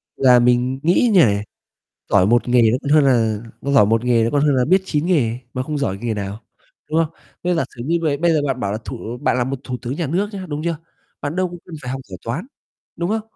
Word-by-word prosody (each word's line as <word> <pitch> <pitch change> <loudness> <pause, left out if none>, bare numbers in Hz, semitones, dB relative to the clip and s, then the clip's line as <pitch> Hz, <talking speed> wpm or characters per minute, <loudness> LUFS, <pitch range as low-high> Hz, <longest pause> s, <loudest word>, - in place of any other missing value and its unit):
Là 125 -2 +5
mình 125 +2 +2
nghĩ 185 +8 +3
như 185 - +6
này, 100 -1 0 0.7
giỏi 90 - +4
1 120 +2 +2
nghề 120 -1 +4
nó 125 - +2
còn 145 - -3
hơn 150 -2 +5
là 115 -5 +2 0.2
nó 140 +1 -2
giỏi 120 -7 +6
1 115 +2 +1
nghề 120 -2 +3
nó 115 - 0
còn 145 - +1
hơn 145 -2 +3
là 125 -1 +2
biết 190 +5 +3
9 155 -2 -1
nghề 125 -10 +1 0.2
mà 130 - -1
không 150 +2 -3
giỏi 100 -8 -2
nghề 115 -2 -2
nào, 100 +2 -5 0.5
đúng 160 - +2
không? 160 - -10 0.3
Thế 180 0 +2
giả 165 - +1
sử 120 - -6
như 170 +3 +1
bầy 145 -3 +1
bây 170 +1 +2
giờ 150 -2 +2
bạn 130 -2 -2
bảo 100 0 -1
là 110 - -2
thủ 120 -1 -6
bạn - - +1
là 120 - +1
một 135 0 -3
thủ 125 -2 -4
tướng 130 +4 -4
nhà 170 - -2
nước 190 +8 0
nhá, 190 -2 -6
đúng 150 +1 -4
chưa? 170 -2 -1 0.4
Bạn 145 +4 -4
đâu 185 -1 +1
có 175 - -9
cần 170 - -10
phải 125 - -5
học 135 0 -4
giỏi 95 -4 -10
Toán, 135 - -4 0.5
đúng 175 +3 -2
không? 220 0 0
135 Hz, 275 wpm, -20 LUFS, 120-165 Hz, 0.7 s, như